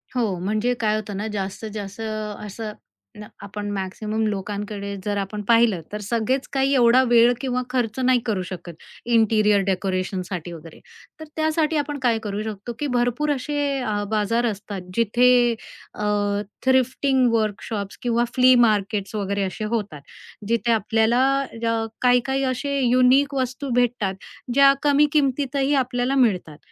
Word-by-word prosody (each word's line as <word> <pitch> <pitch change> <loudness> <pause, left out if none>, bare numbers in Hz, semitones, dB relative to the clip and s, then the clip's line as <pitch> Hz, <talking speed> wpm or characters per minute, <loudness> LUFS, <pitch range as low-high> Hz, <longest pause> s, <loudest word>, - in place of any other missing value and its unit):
हो, 245 - +1 0.2
म्हणजे 215 +6 0
काय 215 -2 +1
होतं 210 -2 -4
ना, 210 +2 -3
जास्तीत 200 +2 -4
जास्त 205 0 -7
असं, 215 0 -5 0.5
न 210 - -8
अ, 210 - -11 0.2
आपण 205 +1 -6
मॅक्सिमम 210 +3 -3
लोकांकडे 200 0 -4
जर 205 -1 -1
आपण 200 +1 -4
पाहिलं, 230 -6 +4
तर 210 - -4
सगळेच 235 +5 -1
काही 270 +1 +2
एवढा 245 0 +5
वेळ 240 +1 +6
किंवा 255 -2 -1
खर्च 250 -1 -1
नाही 255 -1 +3
करू 210 -5 -1
शकत, 175 -2 -8 0.3
इंटिरियर 215 -3 +3
डेकोरेशनसाठी 185 -2 -2
वगैरे. 165 0 -12 0.4
तर 315 - -8
त्यासाठी 315 0 +1
आपण 290 -1 -2
काय 235 -3 +2
करू 205 -1 -3
शकतो, 220 +2 -6
की 295 - -1
भरपूर 245 +5 0
असे 290 +3 -4 0.2
अ, 210 -3 -1
बाजार 225 +3 +1
असतात, 205 -3 -4
जिथे 240 +2 +4 0.4
अ, 210 - -6 0.6
थ्रिफ्टिंग 260 0 +2
वर्कशॉप्स 210 -2 -2
किंवा 240 0 +1
फ्ली 255 0 +6
मार्केट्स 205 -1 -1
वगैरे 200 -1 -1
असे 195 +3 -4
होतात, 200 -10 -4 0.5
जिथे 235 +1 +1
आपल्याला 225 +3 +2 0.4
अ, 230 -1 0 0.2
काही-काही 250 +2 +2
असे 280 +2 -2
युनिक 255 +3 +4
वस्तू 260 +1 -2
भेटतात, 240 -5 +1 0.4
ज्या 275 +1 +6
कमी 290 +1 +4
किमतीतही 275 -1 +1
आपल्याला 250 +2 -1
मिळतात. 180 -8 -3
225 Hz, 145 wpm, -23 LUFS, 205-255 Hz, 0.6 s, वेळ